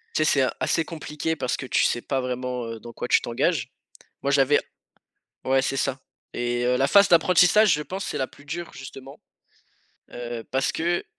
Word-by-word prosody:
tu 155 - +3
sais? - - +1 0.2
C'est 130 - +2
assez 165 - +1
compliqué 160 0 -4
parce 125 -4 -2
que 130 - -6
tu - - +2
sais 120 - +1
pas 135 -2 -2
vraiment, 125 -1 -3
heu, 115 -1 -6
dans 120 +1 -11
quoi - - -5
tu - - +5
t'engages. 135 +4 -1 0.5
Moi, 140 - +1
j'avais 140 +1 +4 0.9
ouais 135 0 +2
c'est 135 - -1
ça 135 0 -1 0.3
et 120 0 -1
heu, 125 0 +2
la 135 - +2
phase 200 +5 +6
d'apprentissage, 180 +3 +5
je 150 - 0
pense 190 +5 -5
c'est - - -4
la 130 - 0
plus 145 - -18
dure, 170 +3 -5
justement, 135 +1 -10 0.9
heu, 120 -1 -6
parce 130 0 +1
que 175 +1 -1
135 Hz, 195 wpm, -24 LUFS, 125-160 Hz, 0.9 s, phase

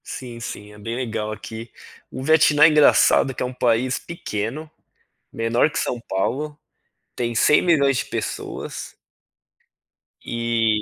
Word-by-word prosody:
Sim, 120 -2 -8
sim, 105 -3 -8
é 105 - -14
bem 115 +3 -5
legal 110 -4 -3
aqui, 110 +2 -8 0.4
o 130 - -6
Vietnã 150 0 +5
é - - +10
engraçado 150 -3 +4
que - - -3
é - - 0
um 125 - -5
país 125 +1 +1
pequeno, 145 -1 -5 0.6
menor 115 +6 +1
que - - -3
São 120 - -2
Paulo, 145 +10 -2 0.6
tem 120 -1 -2
100.000.000 140 +2 +4
de - - -1
pessoas. - - -5 1.2
e 115 -2 0
120 Hz, 135 wpm, -22 LUFS, 115-145 Hz, 1.2 s, é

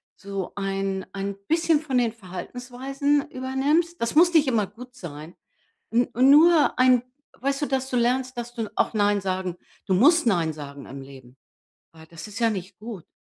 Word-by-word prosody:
so 195 -2 -5
ein 195 -1 -2
ein 200 0 -4
bisschen 325 -1 +3
von 275 -5 -1
den 235 -2 +1
Verhaltensweisen 255 +8 -3
übernimmst, 290 +6 0
das 235 +3 -1
muss 345 +2 +6
nicht 310 -3 +5
immer 220 -6 +1
gut 245 +5 -13
sein. 160 - -9 0.6
N 235 +2 +2
nur 290 +4 +5
ein 255 -1 +5 0.4
weißt 275 +3 -1
du, - - +2
dass 265 -1 -1
du 250 - 0
lernst, 250 +1 0
dass 240 0 -5
du 225 -3 -4
auch - - +1
nein 205 -1 +2
sagen 185 -2 -3 0.3
du 190 - +2
musst 310 - +5
„Nein“ 170 -7 +1
sagen 140 -2 -9
im 135 0 -8
Leben. 130 -2 -14 0.6
Weil 160 -1 -15
das 165 +2 -10
ist 210 +1 -8
ja 230 - +4
nicht 190 -2 -6
gut, 215 -5 -8
230 Hz, 175 wpm, -24 LUFS, 190-265 Hz, 0.6 s, muss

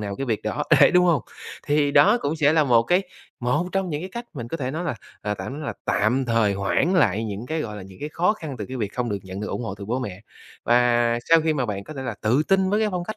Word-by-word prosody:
nào 100 -1 -4
cái 135 - -4
việc 110 -4 -1
đó, - - -2 0.2
đấy - - +8
đúng 180 0 +4
hông? 165 -7 +2 0.4
Thì 145 -1 +2
đó 210 +10 +5
cũng 150 +3 -1
sẽ 150 -1 +3
là 160 -1 +4
một 120 -4 +4
cái 180 +10 +2 0.4
một 125 +8 0
trong 195 -2 -1
những 150 +1 -3
cái 185 - -5
cách 235 0 -5
mình 120 -5 -6
có 165 - -3
thể 130 -5 -3
nói 160 +5 -4
là, 170 - -1 0.3
à, 105 0 -1
tạm 115 - -6
nói 150 +3 -6
là - - -2
tạm 120 +6 +1
thời 115 -3 +2
hoãn 100 - +1
lại 110 - +2
những 105 +2 -5
cái, 160 +3 -2
gọi 105 -7 -5
là, 100 - -7
những 95 0 -13
cái 150 - -4
khó 175 +6 +1
khăn 155 -10 -7
từ 105 - -5
cái 130 - -6
việc 105 -5 -3
không 125 -1 -2
được 100 -2 -2
nhận 95 +1 -7
được 105 - -3
ủng - - -3
hộ 105 -4 -4
từ 100 - -9
bố 120 +5 -2
mẹ. 100 -7 -6 0.4
Và 120 -1 +3
sau 165 0 +6
khi 160 0 +1
mà 130 -4 -1
bạn 100 -2 -4
có 155 - -9
thể 135 - -5
là 125 -4 -4
tự 120 +7 +3
tin 190 -1 +3
với 210 +2 +2
cái 215 - +2
phong 180 -2 -3
cách 215 - -6
130 Hz, 300 wpm, -23 LUFS, 110-160 Hz, 0.4 s, đấy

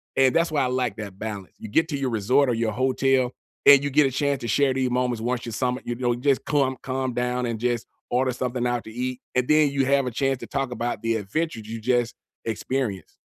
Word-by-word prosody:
and 135 -1 +4
that's 165 -1 +2
why 145 -3 +2
I - - +2
like 125 -1 -1
that 100 -3 -7
balance. 105 -4 -6
You 110 - -8
get 160 +8 +2
to 145 - -2
your 135 -2 -1
resort 125 +5 +2
or - - +2
your 115 -1 0
hotel, 130 +1 +2 0.4
and 140 -1 +9
you 145 - 0
get 145 0 +5
a - - -3
chance 140 0 0
to 120 - -4
share 135 +1 +3
these 130 -1 0
moments 125 -2 0
once 120 0 -2
you 115 - -5
sum 125 +3 -1
it, - - -14
you 120 - -1
know, 120 -1 0
just 135 +2 +1
clum 135 -3 +1
calm 130 -1 -2
down 125 0 -1
and 115 -2 -3
just 120 -1 -1 0.3
order 130 +1 +2
something 125 0 -2
out 120 -1 -1
to 110 - -9
eat, 125 +2 -4
and 125 0 +2
then 150 -1 +5
you 135 -1 +1
have 140 -1 +2
a - - -2
chance 135 +2 0
to - - -8
talk 135 -2 -2
about 120 -2 -3
the 115 0 +1
adventures 110 +2 -3
you 115 0 -5
just 120 0 +1 0.3
experienced. 115 -2 -3
125 Hz, 250 wpm, -24 LUFS, 120-135 Hz, 0.4 s, and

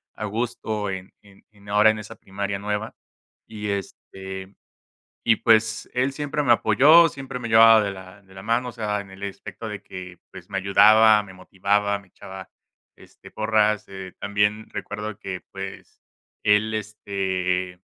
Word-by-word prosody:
a 110 - -5
gusto 110 -1 -3
en 95 0 -7
en 100 -1 -20
en 100 -1 -20
ahora 105 +1 +5
en 110 - +1
esa 105 0 -8
primaria 100 0 -5
nueva. 105 +2 -3 0.5
Y, 105 -1 -7
este, 95 0 -6 0.7
y, 110 - +4
pues, 110 0 +2
él 130 +2 0
siempre 150 +1 -2
me 120 - +5
apoyó, 145 +10 +6
siempre 135 -3 -7
me 120 - -5
llevaba 110 0 +7
de 100 - -2
la 95 +1 -11
de 95 -1 -21
la 95 - -10
mano, 120 +4 0
o - - -15
sea, 105 -3 -2
en 100 -1 -11
el 95 +1 -13
especto 100 +2 -7
de 105 -2 -7
que, 90 -1 -10
pues, 90 -2 -12
me 100 - -4
ayudaba, 105 +2 +6
me 95 -1 -13
motivaba, 100 +2 0
me 100 -1 -19
echaba, 95 +1 -11 0.5
este, - - -17
porras. 110 -1 +1
Eh, 95 -1 -8
también 105 +1 0
recuerdo 105 0 -6
que, 95 -3 -6
pues, 95 -1 -9 0.4
él, 105 +1 +3
este 95 -4 -2
105 Hz, 165 wpm, -23 LUFS, 95-110 Hz, 0.7 s, llevaba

